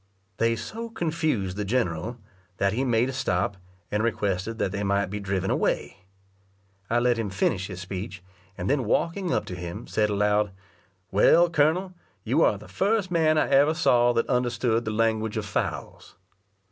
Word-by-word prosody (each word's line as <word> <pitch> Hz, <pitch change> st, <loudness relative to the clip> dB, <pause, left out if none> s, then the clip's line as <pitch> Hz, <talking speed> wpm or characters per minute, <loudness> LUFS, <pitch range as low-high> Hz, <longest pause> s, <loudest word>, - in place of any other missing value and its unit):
They 115 Hz, 0 st, +2 dB
so 225 Hz, -, -6 dB
confused 155 Hz, -, -1 dB
the 105 Hz, -, -1 dB
general, 105 Hz, -1 st, -1 dB, 0.4 s
that 100 Hz, 0 st, +1 dB
he 125 Hz, +4 st, 0 dB
made 120 Hz, -1 st, +2 dB
a 135 Hz, -, -4 dB
stop, 100 Hz, -6 st, -1 dB, 0.3 s
and 105 Hz, -, +1 dB
requested 105 Hz, -1 st, -1 dB
that 95 Hz, -, -1 dB
they 100 Hz, 0 st, -3 dB
might 100 Hz, -1 st, 0 dB
be 105 Hz, -, -3 dB
driven 95 Hz, -1 st, -1 dB
away. 95 Hz, -, -1 dB, 0.8 s
I 120 Hz, -, +2 dB
let 120 Hz, -1 st, +2 dB
him 110 Hz, -3 st, -2 dB
finish 95 Hz, 0 st, 0 dB
his 95 Hz, -2 st, -7 dB
speech, 95 Hz, 0 st, -6 dB, 0.3 s
and 90 Hz, 0 st, -3 dB
then 135 Hz, -3 st, +1 dB
walking 170 Hz, -, 0 dB
up -, -, 0 dB
to 90 Hz, -, -6 dB
him, 85 Hz, -1 st, -6 dB
said 105 Hz, -1 st, 0 dB
aloud, 105 Hz, 0 st, +1 dB, 0.6 s
"Well, 165 Hz, -, +5 dB
colonel, 170 Hz, +5 st, +2 dB, 0.3 s
you -, -, +1 dB
are -, -, +4 dB
the -, -, -13 dB
first 200 Hz, -1 st, 0 dB
man 160 Hz, -2 st, +3 dB
I -, -, +3 dB
ever 145 Hz, +3 st, +4 dB
saw 120 Hz, -7 st, +4 dB
that 115 Hz, 0 st, +1 dB
understood 120 Hz, -2 st, 0 dB
the 110 Hz, -, -2 dB
language 110 Hz, 0 st, 0 dB
of 105 Hz, -, -2 dB
fowls." 105 Hz, -, -4 dB
115 Hz, 170 wpm, -26 LUFS, 100-135 Hz, 0.8 s, Well